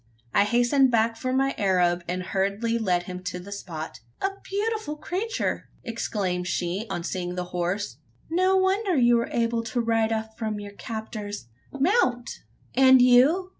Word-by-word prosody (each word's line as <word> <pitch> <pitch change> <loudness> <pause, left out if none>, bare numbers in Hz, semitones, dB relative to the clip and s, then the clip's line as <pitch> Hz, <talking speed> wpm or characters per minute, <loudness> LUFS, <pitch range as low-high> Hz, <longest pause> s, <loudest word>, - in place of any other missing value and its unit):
I 200 - +5
hastened 245 +5 +3
back 230 -1 +2
for 255 +3 -3
my 270 +1 +2
Arab, 180 -3 +2
and 180 +1 -2
hurriedly 200 +5 0
led 180 -5 +1
him 180 0 -6
up 180 - -18
to 180 - -3
the 190 +3 -10
spot. 165 -9 -6 0.2
"A 390 - +1 0.2
beautiful 420 -5 -2
creature!" 380 +9 -3
exclaimed 195 -6 -2
she, 185 +5 -2
on 175 -3 -3
seeing 180 0 -3
the 180 - -2
horse; 180 +4 -2 0.3
"no 370 +3 +3
wonder 380 -1 +2
you 240 -1 +5
were 235 - -1
able 230 0 +1
to 230 +2 -2
ride 225 -1 +1
off 220 0 -3
from 215 -2 -2
your 205 0 -8
captors. 215 - -6 0.3
Mount!" 275 - +2 0.5
"And 260 0 +7
you?" 260 +10 +5
225 Hz, 165 wpm, -26 LUFS, 190-265 Hz, 0.5 s, And